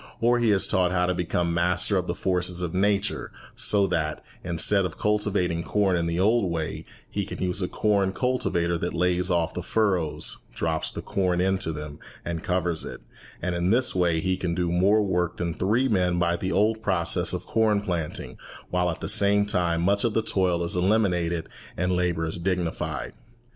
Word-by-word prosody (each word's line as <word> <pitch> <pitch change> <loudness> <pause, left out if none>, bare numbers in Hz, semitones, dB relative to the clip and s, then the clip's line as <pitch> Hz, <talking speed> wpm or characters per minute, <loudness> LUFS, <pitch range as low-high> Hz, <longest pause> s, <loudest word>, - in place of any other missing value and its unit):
Or 120 +1 +3
he 120 -2 +2
is 100 -2 +4
taught 90 -1 +1
how 90 -1 +2
to 90 - 0
become 85 -1 -1
master 90 +3 +2
of 90 -1 0
the 85 - -2
forces 90 -1 -1
of 85 - -3
nature, 100 +1 0 0.2
so 100 -1 +3
that, 75 -5 -2 0.2
instead 90 +3 +2
of 90 -3 -4
cultivating 100 -5 0
corn 100 -1 +1
in 85 -1 0
the 85 +1 -1
old 105 0 +3
way, 80 -2 -4 0.2
he - - -3
can - - -7
use 90 +1 -1
a 90 - 0
corn 100 -2 +1
cultivator 95 -8 0
that 85 - -3
lays 90 +1 +1
off 85 -2 0
the - - -4
furrows, 95 -8 0 0.2
drops 80 -1 -1
the - - -7
corn 90 -2 0
into 95 -2 +1
them, 75 -1 -7 0.3
and 85 -2 -3
covers 90 -3 0
it; - - -8 0.4
and 90 0 -1
in 85 +1 0
this 120 +4 +2
way 85 -3 +1
he 95 +2 0
can 90 -2 -2
do 90 -1 -1
more 100 +5 +3
work 90 -3 -1
than 85 -1 -2
three 110 +10 +1
men 90 -6 +1
by 85 0 +1
the 90 +2 -3
old 110 +2 +2
process 95 -6 +1
of - - -4
corn 110 -2 +2
planting, 85 -6 -4 0.3
while 90 0 +1
at 85 - -5
the - - -3
same 100 0 +3
time 85 -4 +1
much 100 +2 +2
of 115 -3 0
the 110 - +2
toil 90 -5 +1
is 85 - +1
eliminated 90 -3 +1 0.3
and 90 +1 0
labour 85 -2 0
is 80 +1 -4
dignified. 85 -5 -2
90 Hz, 195 wpm, -25 LUFS, 85-100 Hz, 0.4 s, is